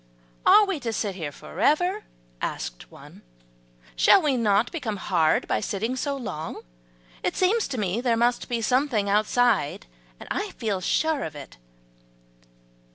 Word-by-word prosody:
"Are 425 - +8
we 390 -6 -2
to 235 -4 -3
sit 210 -2 -2
here 160 -6 -5
forever?" 355 - 0 0.4
asked - - -5
one; - - -15 0.7
"shall 390 - +6
we 300 -6 +1
not 220 0 +2
become 240 -11 -4
hard 165 -5 +1
by - - +1
sitting 215 +4 -2
so 280 +2 -2
long? 160 - -6 0.6
It - - -1
seems 415 +5 +2
to 270 - -5
me 205 +1 -1
there 240 -2 +1
must 240 +1 +1
be 235 -2 -1
something 250 -4 +1
outside, 210 -3 +1 0.3
and - - -11
I - - -2
feel 205 -5 -2
sure 315 - +1
of 155 - -6
it." 140 - -11
230 Hz, 150 wpm, -25 LUFS, 200-280 Hz, 0.7 s, Are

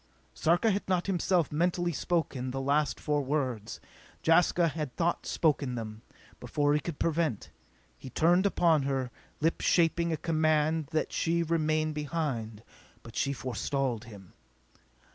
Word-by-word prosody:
_" - - -35 0.3
Sarka 175 +7 +2
had 200 0 -2
not 180 -2 +1
himself 180 -4 +1
mentally 175 +2 +1
spoken 140 -6 -1
the 135 +1 -3
last 140 +2 +1
four 150 -1 0
words. 130 -6 -2 0.4
Jaska 170 +1 +4
had 150 -5 -5
thought 170 0 -1
spoken 145 -5 +1
them, 110 -2 -6 0.4
before 145 0 +1
he 150 - +3
could 155 0 -6
prevent. 160 -8 -1 0.5
He 130 - -9
turned 175 +8 +3
upon 165 -5 +3
her, 135 -2 -2 0.3
lips 165 +2 0
shaping 170 0 +3
a 160 - 0
command 155 -1 +1
that 155 +1 -1
she 170 +1 +1
remain 155 -1 0
behind. 140 -8 -3 0.4
But 115 0 -12
she 140 - 0
forestalled 130 -2 -2
him. 100 -5 -13
155 Hz, 145 wpm, -29 LUFS, 135-170 Hz, 0.5 s, Jaska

